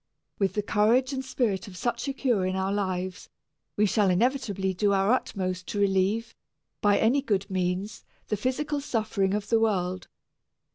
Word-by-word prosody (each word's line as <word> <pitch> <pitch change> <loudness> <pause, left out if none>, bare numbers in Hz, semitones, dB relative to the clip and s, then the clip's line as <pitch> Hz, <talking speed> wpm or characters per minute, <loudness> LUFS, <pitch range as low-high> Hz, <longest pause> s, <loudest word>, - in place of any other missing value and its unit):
With 195 -2 +1
the 210 - -1
courage 230 +6 +2
and 265 0 -3
spirit 230 -6 -1
of 185 -2 -10
such 240 +5 -2
a 275 - -1
cure 245 -8 +1
in 185 0 -1
our 190 +1 0
lives, 185 -2 -3 0.5
we 210 - +4
shall 205 -1 +2
inevitably 200 -2 +1
do 200 +2 +1
our 195 +2 +3
utmost 185 -7 -1
to 205 - -3
relieve, 200 +3 +1 0.5
by 205 -2 +4
any 245 +6 +3
good 200 -7 -1
means, 185 +2 -2 0.2
the 210 - 0
physical 285 +7 -1
suffering 215 -6 0
of 210 0 -4
the 230 - +4
world. 185 -5 0
205 Hz, 165 wpm, -27 LUFS, 190-235 Hz, 0.5 s, we